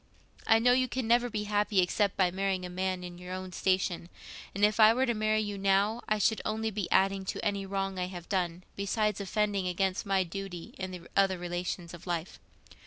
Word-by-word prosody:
I 225 - +6
know 240 +2 +4
you 255 0 +3
can 255 -1 -3
never 240 +1 +3
be 210 -2 -2
happy 210 -1 +1
except 190 +2 +2
by 185 -2 +3
marrying 190 0 -1
a 180 - -6
man 185 0 -2
in 175 0 -8
your 180 0 -7
own 185 0 -6
station; 185 -1 0 0.5
and 205 +1 +4
if 210 +1 +1
I 220 +1 +8
were 260 +1 +2
to 240 - +1
marry 215 0 +1
you 205 -2 -4
now, 200 +4 +2
I 215 - +3
should 215 +2 +2
only 220 +1 -1
be 205 -3 -3
adding 195 0 +3
to - - -4
any 200 -2 -1
wrong 195 -1 -2
I 180 - -1
have 175 -2 -8
done, 180 -2 -1
besides 210 0 0
offending 200 -1 0
against 190 +2 -1
my 195 -1 +3
duty 180 -1 -7
in 185 - -3
the 180 -1 -7
other 195 -1 +3
relations 175 0 -4
of 175 +1 -11
life. 175 0 -3
195 Hz, 215 wpm, -30 LUFS, 180-210 Hz, 0.5 s, I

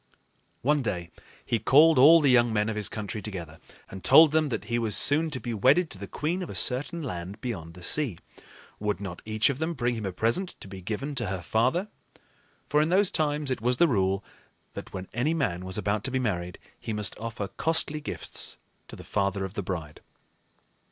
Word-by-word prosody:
One 145 +3 +2
day 90 -8 -3 0.3
he 115 - 0
called 150 +4 +5
all 160 +5 +8
the 140 -3 +4
young 120 -2 +4
men 105 0 +1
of 110 - -3
his 105 -2 -1
country 105 0 -5
together 85 -7 -7 0.3
and 95 0 -10
told 160 -1 +8
them 155 -1 +2
that - - -3
he 120 0 -1
was 110 -3 +1
soon 155 +3 +4
to 135 -4 -2
be 120 -2 -4
wedded 135 - +3
to 95 - -6
the 100 - -7
queen 165 - -2
of 180 - -5
a - - -7
certain 145 +6 0
land 95 -4 -6
beyond 85 -10 -6
the 90 - -12
sea. 130 - 0 0.6
Would 105 -3 -1
not 95 -3 -7
each 110 +4 +2
of 135 - -6
them 165 +1 -2
bring 120 -1 0
him 110 -4 -4
a - - -3
present 115 - -1
to - - -9
be 95 -1 -9
given 115 +10 -4
to 120 -6 -2
her 95 -2 -4
father? 130 - +1 0.8
For 150 +1 +3
in 155 - +1
those 190 +2 +3
times 150 -2 0
it 130 - -2
was 125 +1 +1
the 170 - +5
rule, 95 -6 +1 0.5
that - - -8
when 95 0 -6
any 140 +8 0
man 90 - -1
was 95 +1 -2
about 105 0 -1
to - - 0
be 130 - 0
married, 90 -8 -2 0.2
he 110 - -5
must 105 -3 -1
offer 110 -2 -4
costly 160 -2 -1
gifts - - -3 0.3
to - - -10
the - - -11
father 100 -1 -1
of 95 - -8
the 100 - -3
bride. 85 -5 -6
115 Hz, 215 wpm, -27 LUFS, 95-145 Hz, 0.8 s, all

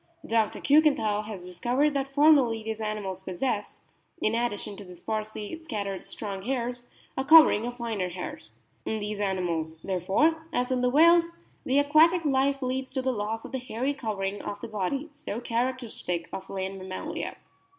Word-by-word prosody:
Dr. 225 -2 +1
Kiikenthal 280 -9 +3
has 200 -5 -7
discovered 245 - +1
that 275 -1 -2
formerly 275 -6 +5
these 220 0 -4
animals 205 -3 -3
possessed, 205 +3 -3 0.4
in 215 - +1
addition 230 -3 -2
to 205 - -8
the 180 -2 -11
sparsely 215 - -4
scattered 200 - -4
strong 200 -3 -5
hairs, 245 +1 -3 0.3
a 265 - -1
covering 285 -7 +7
of 245 0 -6
finer 220 -6 -2
hairs. 180 +1 -8 0.2
In 220 - -2
these 210 0 -4
animals, 175 -5 -1
therefore, 210 - +1
as 250 -4 0
in 255 -1 +1
the 250 - +3
whales, 335 +4 +5 0.3
the 265 - +2
aquatic 315 +4 +5
life 275 0 +2
leads 260 +1 -2
to 260 -2 -1
the 260 0 +1
loss 220 +1 -3
of - - -9
the 265 - -2
hairy 255 +3 -2
covering 205 -6 -3
of 205 - -5
the 235 - -5
body, 220 - -2
so 290 -7 -6
characteristic 235 -7 -2
of 190 - -6
land 190 0 -4
mammalia. 190 - -5
230 Hz, 165 wpm, -27 LUFS, 200-275 Hz, 0.4 s, covering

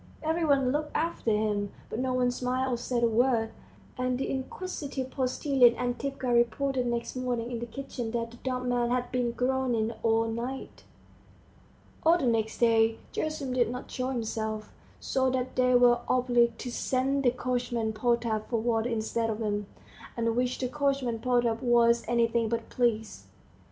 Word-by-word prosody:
Every 320 +2 0
one 275 -4 +3
looked 300 +2 -2
after 330 -7 -1
him, 210 -2 0 0.2
but 225 - -5
no 260 0 0
one 250 -1 +2
smiled 255 +1 -1
or - - 0
said 240 0 -1
a - - +6
word, 230 0 +2 0.5
and 255 0 0
the 270 - -2
inquisitive 270 -1 -4
postilion 255 -2 +3
Antipka 255 +2 -3
reported 245 +2 +1
next 235 +1 -2
morning 245 -2 -2
in 235 - -3
the 235 - -5
kitchen 245 -1 -5
that 230 0 -3
the 240 - -13
dumb 255 0 -3
man 240 -1 +1
had 245 0 -1
been 250 -1 0
groaning 250 -3 0
all 225 0 +2
night. 240 +4 -5 1.2
All 330 +2 +5
the 280 - -1
next 225 -2 0
day 225 -1 +3 0.2
Gerasim 305 -4 -2
did 240 -3 +2
not 250 +2 -6
show 255 -1 -2
himself, 220 -3 -3 0.3
so 260 -1 +1
that 255 0 -2
they 250 0 +3
were 245 -1 +6
obliged 240 -2 +3
to 250 - -4
send 265 +3 0
the 250 - +5
coachman 245 -2 -1
Potap 230 -1 0
for 235 - +1
water 230 0 0
instead 225 0 -1
of 215 - -2
him, 205 -2 -2 0.5
at 235 - -1
which 250 +1 0
the 255 - -1
coachman 275 -4 0
Potap 240 -2 +1
was 235 -1 +4
anything 235 -1 +2
but 230 0 -3
pleased. 225 -3 -1
245 Hz, 165 wpm, -28 LUFS, 230-255 Hz, 1.2 s, a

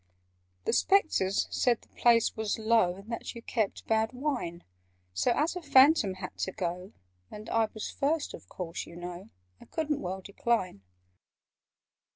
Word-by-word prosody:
"The - - +1
Spectres 310 - +3
said 240 -3 +2
the - - -21
place 235 -2 +3
was 220 -2 -1
low, 220 -5 +3
And 200 +4 -11
that 230 - -5
you 230 - -9
kept 220 -5 -2
bad 220 +1 +1
wine: 250 - -3 0.5
So, 90 +1 +1
as 315 +4 +1
a 360 - -4
Phantom 270 - +5
had 185 - -7
to 190 - -1
go, 180 0 -4 0.4
And 210 +1 -9
I 225 -1 +3
was 215 - -4
first, 295 +2 -1
of - - -11
course, 170 -2 -5
you 170 - -11
know, 175 +3 -7 0.3
I - - -14
couldn't 305 -2 -2
well 190 +1 -4
decline." 200 - -1
220 Hz, 160 wpm, -29 LUFS, 185-260 Hz, 0.5 s, Phantom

